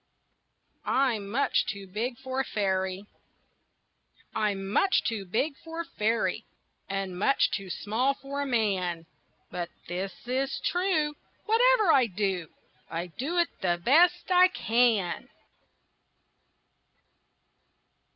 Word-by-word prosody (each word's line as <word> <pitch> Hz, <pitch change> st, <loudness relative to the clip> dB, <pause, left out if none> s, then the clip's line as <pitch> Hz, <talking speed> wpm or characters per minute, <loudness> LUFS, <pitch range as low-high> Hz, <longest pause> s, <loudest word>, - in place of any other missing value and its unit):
I'M 235 Hz, -7 st, +1 dB
MUCH 270 Hz, +7 st, +1 dB
TOO 200 Hz, -2 st, -4 dB
BIG 225 Hz, +6 st, -3 dB
FOR 260 Hz, 0 st, -4 dB
A -, -, +2 dB
FAIRY 190 Hz, -3 st, -1 dB, 1.3 s
I'm 205 Hz, -3 st, -1 dB
much 380 Hz, -, +2 dB
too 215 Hz, -4 st, -2 dB
big 245 Hz, -, 0 dB
for 330 Hz, 0 st, -5 dB
a -, -, -7 dB
fairy, 225 Hz, -7 st, -1 dB, 0.5 s
And 195 Hz, -2 st, -3 dB
much 275 Hz, +7 st, +3 dB
too 195 Hz, -2 st, -4 dB
small 235 Hz, +9 st, 0 dB
for 280 Hz, +1 st, -5 dB
a 285 Hz, -, -2 dB
man, 190 Hz, -8 st, 0 dB, 0.5 s
But 175 Hz, -1 st, -4 dB, 0.2 s
this 185 Hz, +3 st, -3 dB
is 265 Hz, +2 st, -1 dB
true: 350 Hz, -5 st, +1 dB, 0.3 s
Whatever 455 Hz, -3 st, +4 dB
I 260 Hz, -3 st, +5 dB
do, 190 Hz, -4 st, -2 dB, 0.4 s
I 170 Hz, +1 st, -4 dB
do 315 Hz, +8 st, -2 dB
it 345 Hz, -1 st, +3 dB
the 175 Hz, -3 st, +1 dB
best 350 Hz, +7 st, +4 dB
I 365 Hz, 0 st, +7 dB
can. 230 Hz, -, +1 dB
230 Hz, 115 wpm, -28 LUFS, 195-280 Hz, 1.3 s, I